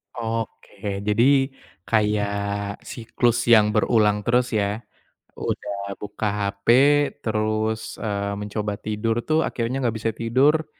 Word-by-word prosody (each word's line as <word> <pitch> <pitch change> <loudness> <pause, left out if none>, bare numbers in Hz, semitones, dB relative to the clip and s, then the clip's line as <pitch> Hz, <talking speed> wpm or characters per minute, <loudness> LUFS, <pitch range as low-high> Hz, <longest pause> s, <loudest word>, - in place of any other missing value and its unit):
Oke. 110 -3 -4
Jadi 135 +6 +3 0.4
kayak 100 -1 0
siklus 120 0 -1
yang 105 -2 +6
berulang 105 -2 +3
terus 120 0 +2
ya, 105 +1 0 0.6
udah 100 0 -4
buka 105 +1 -3 0.2
HP 100 0 -34 0.6
terus, 110 0 -1
eee, 100 -1 -2
mencoba 105 0 -3
tidur 110 +2 -2
tuh 155 0 +1
akhirnya 120 +3 -2
nggak 115 -1 0
bisa 115 0 -1
tidur, 140 +7 +2
110 Hz, 110 wpm, -23 LUFS, 105-115 Hz, 0.6 s, yang